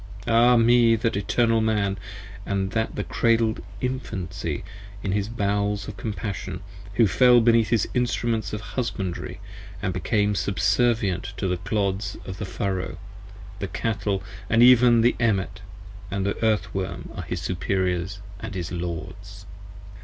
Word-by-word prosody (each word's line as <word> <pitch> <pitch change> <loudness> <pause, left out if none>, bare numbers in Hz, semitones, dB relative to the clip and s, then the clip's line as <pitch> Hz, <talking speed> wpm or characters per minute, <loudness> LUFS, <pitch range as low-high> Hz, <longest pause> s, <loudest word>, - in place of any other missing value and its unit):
Ah 120 +1 +5
me! 115 0 +5
of 110 - -6
that 115 -3 +1
Eternal 115 +3 +2
Man, 105 -3 +1 0.5
And 95 0 -2
of 110 0 0
the - - -2
cradle'd 115 -2 +1 0.2
Infancy 125 -8 -3 0.4
in 95 - -1
his 100 +1 0
bowels 100 -2 -1
of 105 - -6
compassion, 95 -2 -4 0.2
35 100 0 -14
Who 115 - +6
fell 125 +3 +6
beneath 115 -1 +4
his 115 -3 +2
instruments 115 -4 0
of 105 - -4
husbandry 100 -6 -4 0.3
& 95 -1 -4
became 105 +2 +1
Subservient 100 0 +1
to 95 - -1
the 90 0 0
clods 100 0 -1
of 95 0 -7
the 105 - -3
furrow: 95 -1 -3 0.6
the 100 - -2
cattle 100 -2 -2 0.3
and 115 +2 +5
even 120 -1 +7
The 120 +2 +3
emmet 105 -6 0 0.5
and 100 -1 -2 0.2
earth 105 -5 +1
worm 95 -1 -4
are - - -4
his - - -4
superiors 95 +1 -1 0.2
& 110 +1 -6
his 85 -3 -4
lords. 90 +3 -6
105 Hz, 145 wpm, -25 LUFS, 95-115 Hz, 0.6 s, even